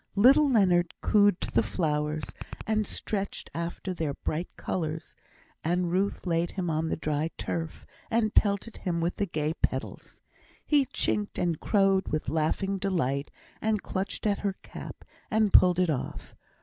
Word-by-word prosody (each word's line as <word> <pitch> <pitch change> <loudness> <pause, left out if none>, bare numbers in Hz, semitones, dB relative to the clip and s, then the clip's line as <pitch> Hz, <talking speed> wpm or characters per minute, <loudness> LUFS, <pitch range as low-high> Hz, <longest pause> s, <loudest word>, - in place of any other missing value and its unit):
Little 275 +8 +6
Leonard 180 -7 +3
cooed 205 -3 +4
to - - -3
the 115 - +4
flowers, 150 - -1 0.4
and 215 -1 +1
stretched 200 -2 -3
after 170 +3 -4
their 155 -5 -2
bright 165 +3 -3
colours; 160 -3 -3 0.5
and 175 +1 +1
Ruth 195 +3 0
laid 170 -1 +1
him 180 -4 -2
on 160 +1 0
the - - 0
dry 155 0 -1
turf, 165 -2 -4 0.2
and 225 -2 +1
pelted 200 +2 +2
him 175 -3 -2
with 170 +1 -1
the 200 - 0
gay 155 -2 -1
petals. - - -3 0.5
He 290 -3 +4
chinked 210 -1 -1
and 170 -3 0
crowed 195 -2 +3
with 155 -4 -2
laughing 165 +6 0
delight, 145 -8 0 0.3
and 215 -2 0
clutched 195 +3 -3
at 205 -2 +2
her 200 -2 -1
cap, - - -9 0.2
and 215 -2 +2
pulled 180 -1 +7
it 180 -3 +3
off. 135 - -5
180 Hz, 155 wpm, -28 LUFS, 160-200 Hz, 0.5 s, pulled